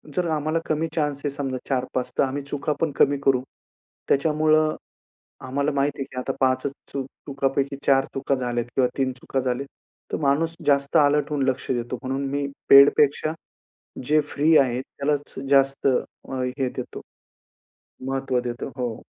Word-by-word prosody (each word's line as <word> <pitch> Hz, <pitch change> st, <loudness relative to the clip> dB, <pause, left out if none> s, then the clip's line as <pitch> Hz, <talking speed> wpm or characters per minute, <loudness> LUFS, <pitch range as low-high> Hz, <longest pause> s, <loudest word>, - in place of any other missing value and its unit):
जर 180 Hz, -1 st, +1 dB
आम्हाला 155 Hz, +2 st, 0 dB
कमी 155 Hz, +1 st, 0 dB
चान्स 150 Hz, -3 st, 0 dB
आहे 145 Hz, -, +2 dB
समजा 135 Hz, -2 st, -3 dB
4-5 130 Hz, -1 st, -1 dB
तर -, -, +4 dB
आम्ही 135 Hz, +2 st, -2 dB
चुका 145 Hz, +1 st, -2 dB
पण 160 Hz, -, +1 dB
कमी 140 Hz, 0 st, +4 dB
करू. 130 Hz, -2 st, +3 dB, 0.7 s
त्याच्यामुळे 155 Hz, +2 st, +3 dB, 0.9 s
आम्हाला 140 Hz, +3 st, 0 dB
माहिती 140 Hz, 0 st, 0 dB
आहे, 135 Hz, -, -1 dB
की 130 Hz, -, -7 dB
आता 135 Hz, +1 st, -2 dB
5 130 Hz, 0 st, +2 dB
च 140 Hz, -, -1 dB, 0.6 s
चुकांपैकी 140 Hz, 0 st, -1 dB
4 135 Hz, 0 st, +5 dB
चुका 135 Hz, +1 st, 0 dB
झाल्यात 120 Hz, -2 st, -1 dB
किंवा 130 Hz, -2 st, +3 dB
3 130 Hz, -1 st, +1 dB
चुका 130 Hz, +1 st, -3 dB
झाल्या, 130 Hz, +2 st, -2 dB, 0.5 s
तर -, -, +1 dB
माणूस 155 Hz, +4 st, +1 dB
जास्त 140 Hz, -1 st, +2 dB
अलर्ट 150 Hz, 0 st, +3 dB
होऊन 145 Hz, -2 st, 0 dB
लक्ष 130 Hz, 0 st, -2 dB
देतो 120 Hz, 0 st, -2 dB
म्हणून 135 Hz, +2 st, -2 dB
मी 140 Hz, 0 st, -1 dB, 0.2 s
पेड 140 Hz, +1 st, +10 dB
पेक्षा, 150 Hz, +2 st, +2 dB, 0.7 s
जे 150 Hz, +3 st, +4 dB
फ्री 155 Hz, +3 st, +4 dB
आहे 125 Hz, -2 st, +2 dB
त्यालाच 145 Hz, +1 st, -3 dB
जास्त 135 Hz, 0 st, +3 dB
अ, 130 Hz, 0 st, -2 dB, 0.3 s
हे 130 Hz, -, +1 dB
देतो. -, -, -6 dB, 1.1 s
महत्व 135 Hz, -2 st, 0 dB
देतो. 120 Hz, 0 st, -5 dB
हो. 120 Hz, -3 st, -2 dB
140 Hz, 160 wpm, -24 LUFS, 130-145 Hz, 1.1 s, पेड